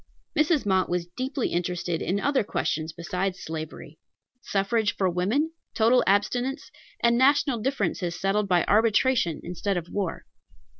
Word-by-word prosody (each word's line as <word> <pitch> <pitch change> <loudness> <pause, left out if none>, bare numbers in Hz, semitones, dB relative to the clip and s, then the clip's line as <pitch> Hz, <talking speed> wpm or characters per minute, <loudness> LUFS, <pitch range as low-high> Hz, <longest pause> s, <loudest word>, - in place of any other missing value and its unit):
Mrs. 305 -2 +2
Mott 190 -2 +2
was 175 -1 -1
deeply 255 +8 -3
interested 175 -1 -2
in 195 +3 0
other 280 +1 +1
questions 160 -4 -2
besides 180 +3 -3
slavery, 155 -1 -7 0.4
suffrage 210 +1 0
for 190 - +1
women, 205 - 0 0.2
total 235 +3 +4
abstinence, 245 +8 0 0.3
and 235 0 +3
national 275 -2 +3
differences 210 -8 -2
settled 200 +1 +1
by 180 -2 +3
arbitration 220 - +3
instead 180 +2 -2
of 175 -1 -5
war. 195 -4 -3
200 Hz, 135 wpm, -26 LUFS, 175-245 Hz, 0.4 s, total